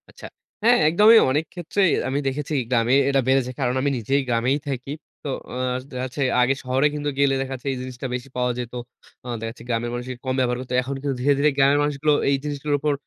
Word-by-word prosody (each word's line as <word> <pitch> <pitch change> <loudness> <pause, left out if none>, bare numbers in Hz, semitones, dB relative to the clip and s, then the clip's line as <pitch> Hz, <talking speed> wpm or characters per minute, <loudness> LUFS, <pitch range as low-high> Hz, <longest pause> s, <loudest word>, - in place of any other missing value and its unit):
আচ্ছা। - - -13 0.4
হ্যাঁ, 240 +2 +6
একদমই 210 +7 +7
অনেক 150 +4 +1
ক্ষেত্রেই 180 +1 +1 0.2
আমি 135 +2 0
দেখেছি 145 +3 -3 0.2
গ্রামে 120 +1 +3
এটা 135 -1 +3
বেড়েছে। 130 -1 +2
কারণ 125 -2 +1
আমি 140 - +1
নিজেই 135 +5 0
গ্রামেই 120 +3 +1
থাকি। 135 0 -4 0.3
তো - - -2 0.2
অ - - -5 0.3
দেখ 130 - -8
যাচ্ছে 130 +2 -5 0.2
আগে 125 +2 +3
শহরে 130 +3 +2
কিন্তু 145 0 -2
গেলে 140 -1 +3
দেখাচ্ছে 135 0 -5
এই 130 - -3
জিনিসটা 130 0 -6
বেশি 125 +2 -7
পাওয়া 125 0 +1
যেত। 120 -1 -6 0.5
অ - - -8
দেখা 115 0 -4
যাচ্ছে 115 +1 -12
গ্রামের 120 0 -1
মানুষই 125 +1 -5
কম 130 - 0
ব্যবহার 125 -1 +1
করত। 130 - -10
এখন 135 +2 -4
কিন্তু 140 -1 -2
ধীরে, 140 +3 +4
ধীরে 150 +2 +4
গ্রামের 140 +1 +4
মানুষগুলো 150 +1 +1 0.2
এই 140 - +3
জিনিসগুলোর 145 0 -1
উপর 150 +1 +1
135 Hz, 210 wpm, -23 LUFS, 125-145 Hz, 0.5 s, একদমই